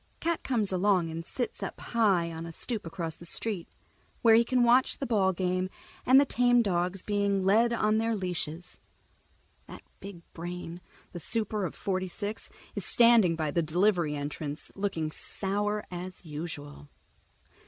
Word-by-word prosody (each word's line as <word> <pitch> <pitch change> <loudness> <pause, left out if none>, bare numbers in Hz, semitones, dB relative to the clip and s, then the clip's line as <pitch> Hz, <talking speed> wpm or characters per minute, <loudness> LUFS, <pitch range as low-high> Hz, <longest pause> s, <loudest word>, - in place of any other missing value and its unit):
Cat 335 0 -1
comes 220 -7 +1
along 185 -3 +2
and 165 +1 -5
sits 245 +8 -4
up - - -5
high 195 -8 +1
on 165 +1 -6
a - - -7
stoop 210 +3 -5
across 165 -2 -4
the 170 - -15
street, 185 +1 -3 0.6
where 225 -1 +7
he 230 +1 +7
can 250 +1 +2
watch 245 +2 +4
the 275 - -3
ball 200 -6 +2
game 185 0 -1 0.4
and 260 +2 +8
the 285 - +5
tame 245 -2 +3
dogs 180 -1 -1
being 200 -2 +1
led 220 +5 +4
by 235 - -1
on 215 0 +2
their 225 0 0
leashes. 180 -3 -4 0.9
That - - -11 0.2
big 195 -4 -10
brain, 175 0 -6 0.3
the 175 - -6
super 215 +2 -1
of 165 - -5
Forty 185 -1 -2
six, 205 +4 -3 0.2
is - - -3
standing 230 -8 +5
by 155 -2 -1
the 170 - +1
delivery 170 -1 +2
entrance, 145 +1 -5
looking 180 -6 -2
sour 205 +5 -2
as 180 +1 -7
usual. 150 -2 -7
190 Hz, 165 wpm, -29 LUFS, 170-220 Hz, 0.9 s, and